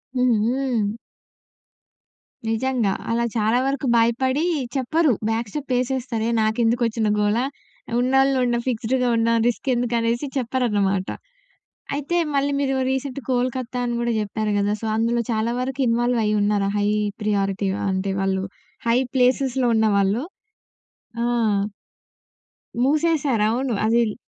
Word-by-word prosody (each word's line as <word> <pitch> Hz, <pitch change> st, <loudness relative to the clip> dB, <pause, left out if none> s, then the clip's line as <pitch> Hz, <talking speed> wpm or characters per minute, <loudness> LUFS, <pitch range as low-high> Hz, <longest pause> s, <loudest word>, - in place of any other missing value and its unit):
హుహు. 245 Hz, -2 st, +1 dB, 1.6 s
నిజంగా, 225 Hz, -3 st, 0 dB, 0.2 s
అలా 235 Hz, +1 st, +1 dB
చాలా 220 Hz, +2 st, +2 dB
వరకు 275 Hz, 0 st, -1 dB
భయపడి 260 Hz, +5 st, +2 dB, 0.3 s
చెప్పరు, 300 Hz, +4 st, +2 dB, 0.2 s
బ్యాక్‌స్టెప్ 235 Hz, +5 st, -3 dB
ఏసేస్తారే 250 Hz, -3 st, -2 dB
నాకెందుకొచ్చిన 225 Hz, 0 st, +1 dB
గోల? 210 Hz, +1 st, +2 dB, 0.6 s
ఉన్నోళ్ళు 270 Hz, +2 st, +3 dB
ఉన్నం 240 Hz, -1 st, 0 dB
ఫిక్స్‌డ్‌గా 250 Hz, +1 st, 0 dB
ఉన్నాం. 230 Hz, 0 st, +2 dB
రిస్కెందుకు 245 Hz, -1 st, 0 dB
అనేసి 235 Hz, +5 st, -1 dB
చెప్పరన్నమాట. 210 Hz, -7 st, 0 dB, 0.9 s
అయితే 295 Hz, +5 st, -1 dB, 0.2 s
మళ్ళీ 280 Hz, +1 st, +1 dB
మీరు 270 Hz, -1 st, 0 dB, 0.2 s
రీసెంట్ 265 Hz, 0 st, -3 dB
కోల్‌కత్తా 250 Hz, 0 st, -1 dB
అని 240 Hz, -1 st, -1 dB
కూడా 235 Hz, 0 st, 0 dB
జెప్పారు 210 Hz, 0 st, -2 dB
గదా! 205 Hz, +1 st, +1 dB
సో 225 Hz, -, -3 dB
అందులో 235 Hz, +1 st, +1 dB
చాలా 225 Hz, +2 st, 0 dB
వరకు 265 Hz, +1 st, -3 dB
ఇన్వాల్వ్ 240 Hz, +1 st, +1 dB
అయ్యి 210 Hz, 0 st, +1 dB
ఉన్నారా? 205 Hz, -1 st, +1 dB
హై 205 Hz, 0 st, +1 dB, 0.4 s
ప్రియారిటీ 200 Hz, -1 st, 0 dB, 0.2 s
అంటే 190 Hz, +1 st, -1 dB
వాళ్ళు 190 Hz, 0 st, 0 dB, 0.4 s
హై 230 Hz, +1 st, +4 dB, 0.2 s
ప్లేసెస్‌లో 255 Hz, 0 st, +2 dB
ఉన్నవాళ్ళు. 210 Hz, +1 st, +2 dB, 1.0 s
ఆ! -, -, +1 dB, 1.6 s
మూసేసారు. 290 Hz, -5 st, +2 dB
అవును 250 Hz, +2 st, -1 dB
అదిల 225 Hz, -1 st, +2 dB
235 Hz, 110 wpm, -22 LUFS, 220-260 Hz, 1.6 s, హై